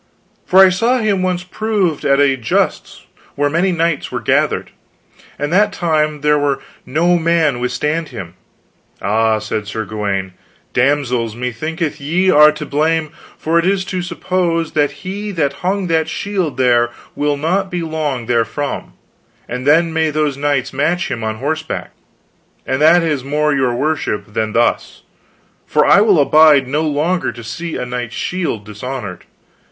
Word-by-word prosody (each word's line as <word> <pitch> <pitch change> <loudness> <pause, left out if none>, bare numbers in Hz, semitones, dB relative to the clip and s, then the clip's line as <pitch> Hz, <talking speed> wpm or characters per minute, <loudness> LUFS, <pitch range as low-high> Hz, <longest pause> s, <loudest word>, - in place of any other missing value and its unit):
" - - -40
for 185 - +2
I - - +5
saw 230 +7 +1
him 210 -5 0
once 180 -1 -1
proved 190 -4 -1
at 140 0 +3
a 140 -1 +4
justs 115 -4 -2 0.3
where 145 0 0
many 175 +4 +2
knights 165 -3 -1
were - - -2
gathered, - - 0 0.7
and 145 +3 -2
that 210 +3 +4
time 155 -3 0
there 150 0 +3
might 140 -1 +1 0.3
no 170 +5 +2
man 160 -5 +1
withstand 150 +6 -2
him. 85 -3 -8 0.7
Ah, 110 +2 +1
said 105 -1 -4
Sir 110 +1 -4
Gawaine, 100 -3 -3 0.4
damsels, 125 -4 +1
methinketh 150 +7 -3
ye 175 +6 +1
are 150 -1 +7
to 150 0 -7
blame, 155 +1 0 0.3
for 165 +2 +1
it 170 - 0
is 190 -1 +1
to 185 -1 -3
suppose 175 -2 -1
he 155 +8 -2
that 150 -6 0
hung 190 +1 0
that 160 -2 0
shield 180 -7 -2
there 120 -2 +3 0.3
will 145 0 0
not 185 +6 0
be 175 -2 -3
long 150 -6 -3
therefrom, 120 +5 -2 0.5
and 125 +3 -5
then 165 +2 +4
may 160 -1 +1
those 150 -2 0
knights 140 -2 -1
match 165 +7 0
him 115 - -3
on 110 0 -2
horseback, 155 +6 -4 0.7
and 130 +2 -1
that 165 +3 +6
is 150 -5 -1
more 150 +2 0
your 130 -3 +1
worship 140 -7 -2
than 110 0 -1
thus; 120 +1 0 0.6
for - - +3
I 200 - +6
will 205 -6 +4
abide 145 -2 +5
no 145 +4 0
longer 160 +4 0
to 120 - -10
see 155 +9 -5
a - - -3
knight's 125 -1 -5
shield 170 - -3
dishonored. 105 -2 -7
150 Hz, 160 wpm, -17 LUFS, 125-170 Hz, 0.7 s, are